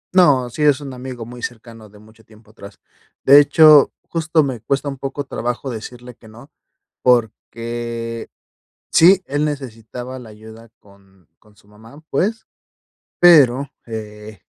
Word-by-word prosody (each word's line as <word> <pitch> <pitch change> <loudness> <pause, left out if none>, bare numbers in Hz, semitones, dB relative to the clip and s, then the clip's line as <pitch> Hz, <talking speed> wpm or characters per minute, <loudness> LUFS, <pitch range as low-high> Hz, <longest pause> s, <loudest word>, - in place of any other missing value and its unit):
No, 145 -9 +4
sí, 150 - -7
es 145 -2 +3
un 140 -2 -8
amigo 125 -2 -8
muy 120 +1 -11
cercano 115 -2 -9
de 105 - -19
mucho 110 +2 -20
tiempo 110 0 -21
atrás. 100 -2 -14 0.5
De 140 +2 +8
hecho, 150 0 +6 0.2
justo, 160 -1 0
me 130 -6 -5
cuesta 140 +4 -2
un 135 -2 -6
poco 135 +1 -5
trabajo 125 0 -5
decirle 125 +2 -9
que 110 - -20
no, 120 +6 -16 0.5
porque, 115 -1 -2 0.6
sí, 185 +3 +5
él 145 +2 -1
necesitaba 125 -2 -7
la 120 - -12
ayuda 110 +2 -14
con 95 -3 -24
con 105 -1 -25
su - - -25
mamá, 110 +8 -17
pues, 220 +4 -2 0.7
pero, 140 -6 +5 0.2
eh, 105 -3 -9
120 Hz, 145 wpm, -19 LUFS, 110-140 Hz, 0.7 s, De